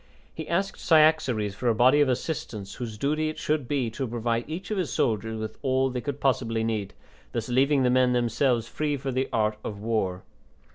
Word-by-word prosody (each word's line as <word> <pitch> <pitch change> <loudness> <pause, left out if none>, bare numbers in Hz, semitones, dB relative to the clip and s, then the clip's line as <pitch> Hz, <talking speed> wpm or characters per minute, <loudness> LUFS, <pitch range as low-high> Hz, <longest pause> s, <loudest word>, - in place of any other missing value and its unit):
He 160 - -7
asked 195 +3 -1
Cyaxares 155 - +3
for 120 +4 -3
a 115 - +3
body 130 +6 +5
of 145 - +3
assistants 120 -7 -3
whose 115 -4 -6
duty 155 +5 0
it 155 - -6
should 150 -4 -1
be 130 -5 -1
to 130 +3 -3
provide 115 +2 -2
each 185 +6 -6
of 210 - 0
his 180 - -2
soldiers 110 -1 0
with 110 0 -6
all 130 -1 +1
they 125 -1 -3
could 145 +1 -4
possibly 115 -5 +1
need, 105 -3 -2 0.4
thus 115 +1 -3
leaving 135 +2 +3
the 125 - +3
men 125 0 +4
themselves 120 0 +1
free 145 +4 -2
for 135 0 -4
the 130 +1 -1
art 105 -1 0
of 105 -2 -5
war. 105 -4 -1
125 Hz, 200 wpm, -26 LUFS, 110-145 Hz, 0.4 s, body